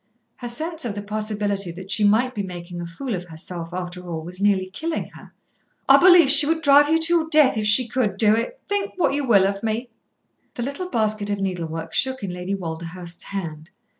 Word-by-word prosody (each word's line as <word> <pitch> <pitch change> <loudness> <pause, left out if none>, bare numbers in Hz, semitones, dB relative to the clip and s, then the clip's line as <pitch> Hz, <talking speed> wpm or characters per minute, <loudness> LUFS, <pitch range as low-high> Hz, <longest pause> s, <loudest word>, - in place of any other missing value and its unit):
her 245 - -7
sense 320 +6 -4
of 220 -4 -4
the 205 - -4
possibility 205 -2 -3
that 185 +3 -10
she 210 - +2
might 225 +5 +3
be 210 - -3
making 175 -2 -7
a 170 - -6
fool 235 +9 -6
of 180 -2 -4
herself 165 0 -7
after 180 0 -6
all 160 -2 -5
was 180 +3 -6
nearly 195 -2 +2
killing 320 - -4
her. - - -15 0.6
"I - - +8
believe 355 -4 +7
she 290 0 +8
would 325 0 0
drive 285 +1 +6
you 320 - +4
to 325 +1 +2
your 320 -2 +1
death 305 -4 +5
if 215 -1 0
she 230 +4 +5
could 220 -5 -1
do 215 0 +4
it, - - -4
think 405 -1 -2
what 355 - +1
you 285 -1 -2
will 200 -5 +5
of 195 0 -2
me." 225 +2 -3 0.7
The 240 - -3
little 280 +8 -5
basket 215 - -1
of 205 -1 -2
needlework 165 -4 -4
shook 260 -3 +1
in 190 - -3
Lady 180 +2 -4
Walderhurst's 170 0 -7
hand. 165 -5 -6
205 Hz, 215 wpm, -22 LUFS, 180-265 Hz, 0.7 s, I